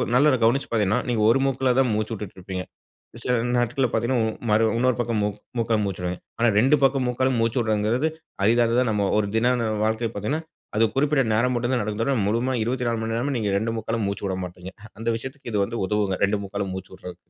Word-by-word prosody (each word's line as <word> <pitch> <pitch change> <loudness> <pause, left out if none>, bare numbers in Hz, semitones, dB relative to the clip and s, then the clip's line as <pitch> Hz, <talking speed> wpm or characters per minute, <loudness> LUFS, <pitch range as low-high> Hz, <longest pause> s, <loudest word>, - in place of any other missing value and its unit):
நல்ல 145 +2 +5
கவனிச்சு 120 +5 +2
பாத்தீங்கன்னா, 110 +1 +2
நீங்க 115 -3 +1
ஒரு 120 - +4
மூக்குல 130 -1 +1
தான் 130 -3 +3
மூச்சு 110 +1 -2
விட்டுட்ருப்பீங்க 95 -2 -6 0.6
சில 125 - 0 0.2
நாட்கள்ல 120 +2 +1
பாத்தீங்கன்னா, 120 +2 +1
ம், - - -8
மறு 110 +2 +4
இன்னொரு 125 +1 +2
பக்கம் 115 -2 0
மூக் 105 -1 -2 0.2
மூக்கால 115 -1 +1
மூச்சு 95 -2 -4
விடுவீங்க. 90 0 -4 0.2
ஆனா, 120 +1 +3
2 135 +6 +4
பக்க 135 0 +3
மூக்காலும் 130 +1 +1
மூச்சு 115 +2 +1
விட்றதுங்கறது 110 +6 +1 0.4
அரிதானது 115 +2 +3
நம்ம 105 -2 +1
ஒரு 105 - +1
தின 115 +2 +3 0.4
வாழ்க்கைல 110 +1 0
பாத்தீங்கன்னா, 140 +11 -2 0.3
அது 110 - +4
குறிப்பிட்ட 140 +1 +2
நேரம் 120 +4 +2
மட்டும் 120 +2 -1
தான் 120 - +1
நடக்கும். 110 +2 0
முழுமயா 120 +5 0
24 120 -1 -1
மணி 115 0 -3
நேரமும் 130 +3 -1
நீங்க 105 -3 -1
2 115 +2 -2
மூக்காலும் 110 -1 -2
மூச்சு 100 0 -3
விட 95 - -2
மாட்டீங்க. 90 +1 -9 0.3
அந்த 115 +1 -3
விஷயத்துக்கு 130 +2 -8
இது 105 - +1
வந்து 115 +3 -5
உதவுங்க. 105 -2 0
இரண்டு 100 +1 +2
மூக்காலும் 100 -1 -4
மூச்சு 95 0 -8
விட்றது. 90 -1 -9
115 Hz, 200 wpm, -24 LUFS, 105-125 Hz, 0.6 s, நல்ல